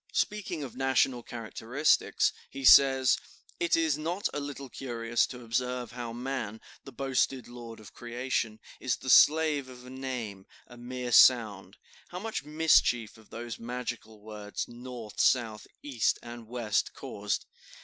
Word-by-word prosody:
Speaking 190 -7 -1
of 130 - -8
national 130 -1 +2
characteristics, 120 +5 0 0.2
he 135 -1 -6
says: 130 -1 +7 0.4
"It 170 - +2
is 160 -3 +1
not 175 +6 -2
a - - -2
little 140 -1 -6
curious 120 -2 -1
to 125 -1 -9
observe 125 +1 -2
how 120 -1 -6
man, 120 -3 -4 0.2
the 135 - -10
boasted 135 0 -1
lord 120 -2 -10
of 110 - -14
creation, 120 -2 -3 0.2
is 130 -4 0
the 130 - -2
slave 150 -3 +5
of 125 -1 -12
a 125 - -10
name, 125 -7 -5 0.2
a 120 - -14
mere 125 0 -5
sound. 105 -7 +5 0.3
How 180 - -8
much 220 -1 -4
mischief 150 -7 +2
have 110 -2 -19
those 115 -1 -7
magical 120 -2 -6
words, 105 -1 -6
North, 120 -2 -9
South, 115 -4 +2 0.2
East, 130 -6 +1
and 120 -1 -9
West 115 -3 -1
caused! - - -3
125 Hz, 145 wpm, -29 LUFS, 115-135 Hz, 0.4 s, says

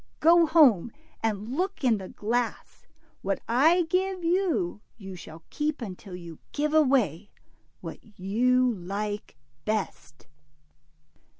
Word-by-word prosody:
Go 335 +1 +6
home, 260 - +5 0.3
and 220 +2 -2
look 375 0 -2
in 230 -5 +3
the 190 - -8
glass. 235 +3 -3 0.3
What - - -1
I 315 +10 +4
give 370 +2 -1
you, 335 - 0 0.2
you 195 -3 -9
shall 160 -2 -11
keep 305 0 -1
until 195 -4 -7
you 170 -3 -10
give 300 +1 0
away 240 - +2 0.5
what - - -7 0.2
you 250 +6 +2
like 205 +2 -5 0.3
best." 200 -8 -4
235 Hz, 115 wpm, -27 LUFS, 195-310 Hz, 0.5 s, Go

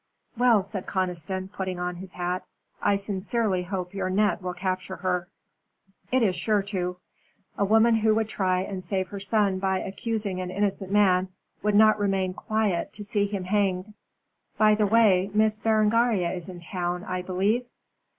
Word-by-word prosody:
"Well," 235 -4 +4
said 195 -1 -6
Conniston, 185 0 -2
putting 185 -2 -4
on 180 0 -3
his 185 0 -10
hat, 180 +1 -2 0.4
"I 200 - +3
sincerely 200 0 -1
hope 180 0 -4
your 195 -2 -2
net 205 +2 +1
will 180 -1 -4
capture 185 0 -3
her." 180 -2 -1 0.8
"It 255 -1 +3
is 190 -4 +2
sure 210 -1 +1
to. 180 -3 -3 0.6
A - - 0
woman 225 +3 +5
who 220 -1 +3
would 220 -1 +1
try 185 -4 0
and 190 -1 -5
save 185 0 -1
her 200 - -6
son 200 -1 +1
by 190 0 +1
accusing 200 -1 -3
an 180 - -4
innocent 195 0 -2
man 190 -3 +3 0.3
would 210 0 +1
not 215 0 +6
remain 195 -2 0
quiet 210 -3 -1
to 210 - -8
see 205 0 +1
him 200 -2 -4
hanged. 195 0 0 0.6
By 215 -1 +5
the 210 -1 +2
way, 200 -4 +4
Miss 215 0 +3
Berengaria 220 -4 +2
is 180 -1 -6
in 180 -2 -9
town, 175 +1 -3
I 185 0 -3
believe?" 200 +7 0
195 Hz, 170 wpm, -26 LUFS, 185-210 Hz, 0.8 s, not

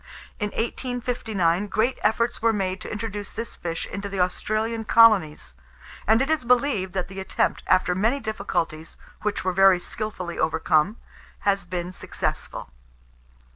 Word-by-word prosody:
In 210 - 0
1859, 225 -6 -1
great 225 +6 0
efforts 230 +2 +1
were 230 0 +4
made 190 -3 -2
to - - -6
introduce 210 -2 -5
this 230 0 -5
fish 165 -1 -4
into 200 +1 -5
the 195 -1 -4
Australian 215 +5 0
colonies; 215 - +4 0.5
and 225 +4 +5
it 275 - -3
is 315 -5 +1
believed 245 -6 +2
that 185 - -1
the 195 0 -8
attempt, 190 - 0
after 185 -1 +3
many 225 +9 +1
difficulties, 175 - -3 0.2
which 210 -1 -1
were 185 0 0
very 195 -1 +6
skilfully 180 -3 -5
overcome, 155 +5 +2 0.4
has 200 -2 +1
been 180 0 -4
successful. 65 - -4
205 Hz, 140 wpm, -24 LUFS, 185-225 Hz, 0.5 s, very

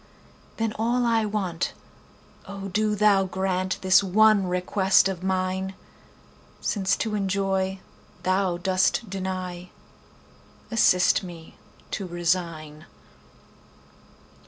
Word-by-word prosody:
Then 225 -1 -1
all 240 +2 +1
I 225 -2 +2
want—O 195 0 -6
do 210 +2 0
Thou 200 -2 +3
grantThis 185 0 +1
one 205 0 +4
request 190 +2 +2
of 190 -2 -4
mine!—Since 190 +1 -4
to 220 -2 -3
enjoy 195 -1 -1 0.4
Thou 185 -1 +1
dost 190 +5 +1
deny, 185 -2 -5 1.0
Assist 185 -5 +4
me 170 -4 -11 0.4
to 195 - -4
resign. 170 -3 -2
190 Hz, 85 wpm, -25 LUFS, 180-200 Hz, 1.0 s, one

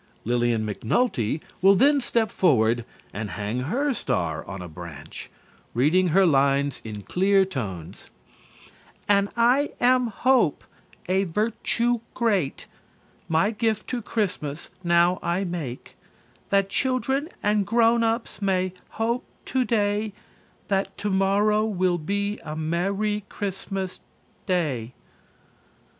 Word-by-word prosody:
Lillian 120 -1 +1
McNulty 115 - 0 0.2
will 195 +1 +7
then 280 +7 +4
step 230 -3 0
forward 120 - +2 0.3
and 105 0 -4
hang 105 +6 -3
her 260 - 0
star 80 - -2
on 100 - -6
a 90 - -7
branch, 80 -2 -9 0.5
reading 160 +9 +3
her 190 +4 +4
lines 140 -2 +2
in 105 -2 -7
clear 195 - +3
tones: 100 - -6 1.0
"_And 200 -1 +3
I 250 +5 +3
am 250 0 +4
Hope, 235 - +2 0.4
a 190 +2 +2
virtue 230 +5 0 0.2
great, 205 - 0 0.6
My 165 +6 +3
gift 220 -1 -1
to 245 -2 -2
Christmas 180 -9 -3
now 170 +1 +3
I 175 +3 0
make, 165 -9 -5 0.5
That 195 -1 +3
children 265 - 0
and 210 0 +2
grown 230 +1 +4
ups 225 -1 -2
may 185 -2 +1 0.2
hope 235 +3 0 0.2
today 215 -5 0 0.5
That 195 -1 -1
tomorrow 205 +2 +2
will 185 -4 +1
be 200 +5 -2
a 150 - -5
merry 195 +6 -1
Christmas 195 -1 -4 0.5
Day_." 140 -10 -1
195 Hz, 115 wpm, -25 LUFS, 140-220 Hz, 1.0 s, will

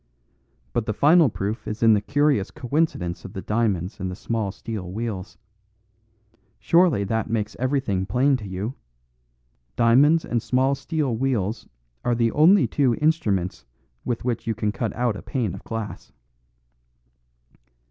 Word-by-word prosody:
But 115 - -1
the 110 - 0
final 155 +2 +5
proof 105 +3 -4
is 110 +2 -3
in 115 -1 +7
the 105 - +2
curious 140 -5 +1
coincidence 125 - -2
of 95 - -9
the 95 - -5
diamonds 105 -4 -1
and 95 -1 -3
the 90 - -5
small 110 -1 -2
steel 105 -4 -6
wheels. 105 -2 -5 1.2
Surely 170 - +3
that 110 +2 -2
makes 110 -1 -2
everything 125 -8 0
plain 130 +7 +3
to 105 -5 -8
you? 95 +6 -4 1.0
Diamonds 145 +8 +4
and 120 -1 -1
small 130 +4 +1
steel 140 -2 -2
wheels 110 -4 -1 0.3
are 120 - +1
the 115 -1 +1
only 170 - +5
two 130 -5 +1
instruments 110 - 0 0.4
with 120 -1 -3
which 120 -3 -2
you 115 - 0
can 105 -1 -1
cut 110 0 -3
out 120 -2 0
a - - -7
pane 115 -9 -2
of - - -9
glass." 115 -2 -6
115 Hz, 145 wpm, -24 LUFS, 105-135 Hz, 1.2 s, in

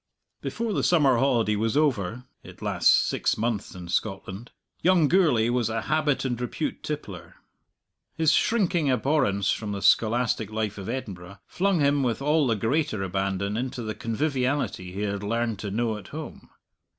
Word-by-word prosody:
Before 230 -2 -3
the - - 0
summer 145 -8 +4
holiday 115 -5 +2
was 110 +5 0
over 125 -6 0 0.2
(it - - -13
lasts - - +2
six - - +2
months 110 -3 -2
in 90 -1 -8
Scotland) 95 +3 -3 0.3
young 175 -4 +4
Gourlay 150 -11 +3
was 120 -2 0
a 115 0 -2
habit 155 -3 0
and 125 -2 -2
repute 125 - -3
tippler. - - -6 0.8
His 160 -2 +3
shrinking 180 -9 +2
abhorrence 125 -7 +1
from 105 -2 -3
the 100 - -4
scholastic 115 -2 +2
life 110 -2 -3
of 95 - -6
Edinburgh 100 -7 -6
flung 190 -3 0
him 140 0 +3
with 120 -4 0
all 150 +1 +2
the 115 - +2
greater 115 0 0
abandon 95 +1 -2
into 125 +1 -3
the 110 -1 -3
conviviality 130 -5 -2
he 95 +3 -5
had 100 -1 -2
learned 115 0 -1
to 100 - -4
know 110 +2 -1
at 95 - -13
home. 155 +1 -9
115 Hz, 165 wpm, -26 LUFS, 105-145 Hz, 0.8 s, summer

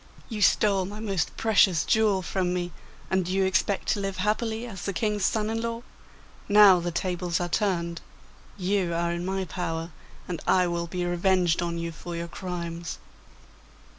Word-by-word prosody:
You 215 -3 -4
stole 200 -2 +4
my 205 +3 -7
most 200 -5 -2
precious 200 -7 +4
jewel 210 -4 +2
from 180 0 -1
me, 175 -1 -2 0.4
and 190 0 +2
do 180 - -4
you 190 0 +2
expect 190 +1 0
to 210 - +1
live 195 -1 -3
happily 220 +3 -1
as 195 -6 -8
the 200 - -1
King's 210 +1 -1
son 215 -1 +1
in 225 +1 -1
law? 230 0 -3 0.7
Now 205 -3 +8
the 175 0 -2
tables 175 0 -1
are 175 - -1
turned; 170 -3 -1 0.6
you 185 -2 0
are 170 0 0
in 170 0 -3
my 190 +1 -2
power, 165 -1 -4 0.4
and 170 -3 -4
I 185 -1 +4
will 170 -1 -2
be 180 +1 -3
revenged 175 -1 +2
on 170 -1 -2
you 170 0 -3
for 170 +2 -7
your 170 0 -4
crimes. 170 -2 -5
185 Hz, 175 wpm, -26 LUFS, 170-205 Hz, 0.7 s, Now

